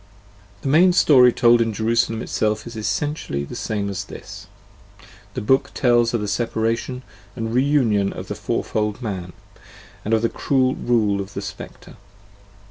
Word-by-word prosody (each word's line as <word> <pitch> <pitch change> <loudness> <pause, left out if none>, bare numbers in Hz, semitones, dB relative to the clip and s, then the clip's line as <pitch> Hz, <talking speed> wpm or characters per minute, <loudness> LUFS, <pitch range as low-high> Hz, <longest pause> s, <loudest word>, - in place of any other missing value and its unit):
The - - -3
main 175 +6 +5
story 130 -8 +6
told 120 0 +4
in 115 -1 0
"Jerusalem" 115 +1 0
itself 110 0 -1
is 115 0 -9
essentially 110 - -2
the 70 - -8
same 105 -2 -3
as 100 0 -4
this: - - -10 0.9
the - - -2
book 130 +6 +2
tells 120 -3 +3
of 115 - -1
the 105 - -3
separation 115 +4 -2 0.3
and 115 0 -4
reunion 125 -7 +2
of - - -8
the - - -4
fourfold 105 +3 -2
man, 95 -5 -4 0.7
and 110 +2 +1
of 110 - -1
the - - +4
cruel 130 -2 +1
rule 105 -6 +1
of 95 - -9
the - - -3
Speclre. - - -10
115 Hz, 155 wpm, -21 LUFS, 105-125 Hz, 0.9 s, story